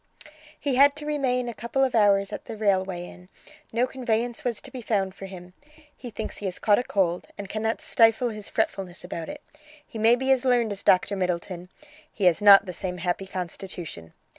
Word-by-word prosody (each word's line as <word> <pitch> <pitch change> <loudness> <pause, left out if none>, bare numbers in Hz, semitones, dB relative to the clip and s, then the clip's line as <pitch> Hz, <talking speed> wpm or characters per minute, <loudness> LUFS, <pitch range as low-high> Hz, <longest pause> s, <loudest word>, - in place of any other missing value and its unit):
"He 275 -3 -1
had 285 +1 +6
to 300 0 -8
remain 260 -5 0
a 235 - -4
couple 235 +5 -1
of 260 - +1
hours 200 -2 +3
at - - -6
the 225 - -7
Railway 190 -4 0
Inn; 180 +1 -14 0.4
no 235 +2 +2
conveyance 240 -2 -2
was 235 -4 -1
to 270 - -11
be 255 -2 -7
found 195 -4 -1
for 195 - -9
him. 180 -1 -11 0.4
He 250 - -9
thinks 220 0 -6
he 205 - -6
has 185 -2 -3
caught 210 0 +3
a - - -1
cold, 180 -6 0
and 200 -1 -6
cannot 220 +2 -2
stifle 225 +1 +3
his 215 -2 -7
fretfulness 185 -2 -2
about 165 -1 -6
it. 295 0 -8 0.4
He 225 - -9
may 225 +2 +5
be 265 +2 0
as 260 -2 +3
learned 245 -4 +2
as 200 - -3
Doctor 185 +2 +3
Middleton; 180 -1 -3 0.4
he 205 - -6
has 180 +1 +4
not 200 -1 +8
the 180 - -6
same 180 0 -3
happy 180 +2 -2
constitution. 175 - -6
210 Hz, 205 wpm, -25 LUFS, 185-245 Hz, 0.4 s, not